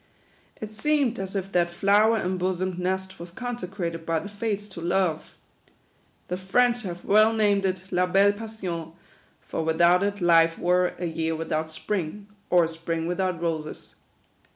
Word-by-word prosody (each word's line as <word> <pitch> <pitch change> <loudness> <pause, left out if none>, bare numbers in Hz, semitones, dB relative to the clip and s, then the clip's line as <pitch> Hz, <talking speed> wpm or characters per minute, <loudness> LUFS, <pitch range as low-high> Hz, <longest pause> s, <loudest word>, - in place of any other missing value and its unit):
It 215 0 -7
seemed 265 0 +1
as 195 +1 -5
if 195 0 -3
that 175 -2 +2
flower 205 +5 +3
em 185 -2 -2
bosomed 185 0 -1
nest 190 +1 -2
was 170 0 -9
consecrated 185 -7 -5
by 165 0 0
the 200 +6 -5
Fates 205 0 -3
to 180 -3 -8
Love. 175 -2 -1 0.9
The 180 - -3
French 240 +6 +2
have 175 -5 -7
well 215 +2 +5
named 205 -3 +2
it 185 -1 -3
La 180 0 +2
Belle 195 +2 +4
Passion; 190 -7 -6 0.5
for 165 - -2
without 170 +3 +4
it 205 0 -1
life 165 -2 +4
were 180 0 +2
" - - -23
a 175 - -3
year 160 -1 -1
without 160 0 -2
spring, 185 +4 -4 0.2
or 175 -1 +5
a - - +1
spring 165 0 -3
without 180 0 -1
roses." 160 -2 -4
185 Hz, 165 wpm, -25 LUFS, 170-205 Hz, 0.9 s, well